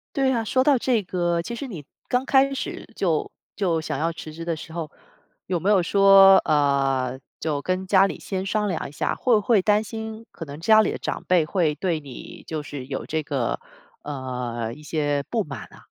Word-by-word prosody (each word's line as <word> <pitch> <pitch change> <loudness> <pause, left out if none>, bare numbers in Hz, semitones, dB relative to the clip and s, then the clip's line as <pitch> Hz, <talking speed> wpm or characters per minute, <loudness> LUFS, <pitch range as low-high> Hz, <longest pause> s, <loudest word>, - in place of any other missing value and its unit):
对 270 -2 +2
呀， 235 -3 +1
说 260 +4 +2
到 280 -1 +4
这 240 -2 +1
个， 175 -2 -1
其 235 +8 -6
实 270 +4 -5
你 175 - -8 0.2
刚 250 +1 +1
开 270 0 +3
始 270 - -5
就 165 -5 0 0.2
就 175 -5 0
想 155 - -3
要 165 +4 0
辞 155 -1 -9
职 165 +2 -8
的 170 -1 -1
时 160 +1 -10
候， 160 -2 -5 0.6
有 180 -2 0
没 195 +5 +1
有 195 -3 +5
说， 195 +1 +7
呃， 135 -3 +1 0.2
就 150 -3 -1
跟 185 +1 -2
家 195 0 +5
里 - - -4
先 190 -1 -4
商 210 +1 0
量 180 -5 -2
一 - - -11
下？ 150 - -2
会 250 - +1
不 215 - +4
会 220 +1 +3
担 210 +2 +3
心 220 0 -7
可 165 - -8
能 145 0 -9
家 215 +6 +5
里 - - 0
的 - - -5
长 - - -4
辈 180 -3 +4
会 155 -1 +1
对 165 +1 -1
你 135 -5 -11
就 155 -2 -4
是 145 -3 -7
有 - - -5
这 160 0 -1
个， - - -2 0.4
呃， 125 -5 -4
一 150 - -14
些 145 -2 -1
不 225 -3 +1
满 140 -6 -8
呐？ - - -16
175 Hz, 230 characters per minute, -24 LUFS, 150-210 Hz, 0.6 s, 说